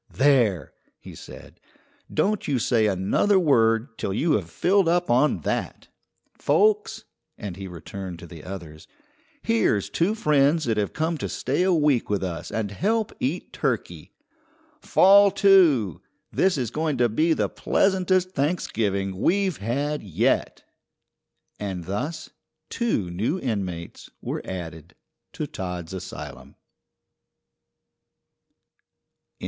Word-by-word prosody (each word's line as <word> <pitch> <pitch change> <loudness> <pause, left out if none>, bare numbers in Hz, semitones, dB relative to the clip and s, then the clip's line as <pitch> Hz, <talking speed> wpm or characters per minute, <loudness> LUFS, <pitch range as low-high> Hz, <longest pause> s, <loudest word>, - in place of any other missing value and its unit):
"There!" 125 - +2 0.2
he - - -12
said, - - -12 0.5
"don't 210 +1 0
you 140 -3 +1
say 115 -2 +2
another 100 - +2
word 115 -7 +2
till - - -2
you 165 +7 +1
have 95 - 0
filled 190 - +2
up 175 -3 +1
on 130 +5 +3
that. - - -3 0.4
Folks" 430 +1 +1 0.3
and 100 -5 -6
he 95 +1 -7
returned 90 +1 -8
to 85 - -11
the 80 -3 -11
others 85 -5 -9 0.6
"here's 110 -3 +1
two 190 +6 +1
friends 150 -4 +2
that 115 -2 0
have 105 -1 -1
come 160 +1 -1
to - - -3
stay 140 +6 -1
a 185 +1 +3
week 150 -7 +2
with 100 -2 0
us 85 -3 -5
and 110 -3 -3
help 215 - -1
eat 150 +8 -3
turkey. - - -3 0.7
Fall 200 -3 +6
to! 160 - +4 0.3
This 190 -4 +2
is 120 -4 -2
going 155 -1 -1
to 120 0 +3
be 155 +9 +2
the - - 0
pleasantest 185 -1 +1
Thanksgiving 105 - -1
we've 190 - +1
had 140 +8 -2
yet." 95 -6 0 1.0
And 95 -4 -4
thus 145 - -4 0.4
two 165 - -1
new 110 - -1
inmates 95 - -4
were - - -4
added 80 -3 -7 0.4
to - - -3
Todd's 90 -1 -6
asylum. 95 - -8
125 Hz, 125 wpm, -24 LUFS, -, 1.0 s, Fall